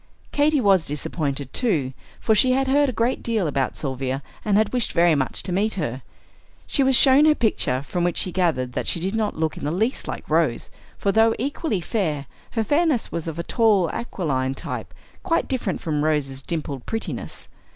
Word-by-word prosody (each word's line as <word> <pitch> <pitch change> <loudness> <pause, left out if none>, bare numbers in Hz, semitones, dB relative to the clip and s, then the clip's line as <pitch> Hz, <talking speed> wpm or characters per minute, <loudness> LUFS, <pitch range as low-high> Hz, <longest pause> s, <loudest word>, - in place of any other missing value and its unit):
Katy 295 0 +3
was 195 -7 +3
disappointed, 145 -2 -3
too, 155 - 0 0.3
for 220 - +2
she 255 +4 +4
had 270 +1 +1
heard 285 +1 +3
a - - 0
great 235 +2 0
deal 225 -5 0
about 140 -3 -1
Sylvia 135 -1 -3 0.2
and 205 -2 +2
had 215 +2 +1
wished 245 -3 0
very 170 -1 +4
much 135 -3 -1
to - - -3
meet 205 +4 +1
her. 135 -8 -3 0.6
She 280 - +1
was 265 -1 +4
shown 270 +3 +6
her 305 -1 +5
picture, 140 - 0
from 170 +6 -2
which 175 -1 0
she 185 - -1
gathered 160 -9 0
that - - -3
she - - +1
did 190 +4 -2
not 220 -2 -1
look 160 -1 -1
in - - -8
the 145 - 0
least 220 +9 -1
like - - -6
Rose; 155 -7 +1 0.3
for 200 - +1
though 225 +2 +4
equally 275 - -2
fair, 160 -8 -2 0.3
her 225 - +1
fairness 295 -1 +1
was 170 -1 -4
of 165 - -4
the 170 - -4
tall 210 -5 +2
aquiline 135 - -2
type, - - -6 0.3
quite 335 -3 0
different 240 -8 -2
from 150 -2 -1
Rose's 145 -4 0
dimpled 140 -5 -4
prettiness. 225 0 -5
185 Hz, 195 wpm, -23 LUFS, 150-230 Hz, 0.6 s, shown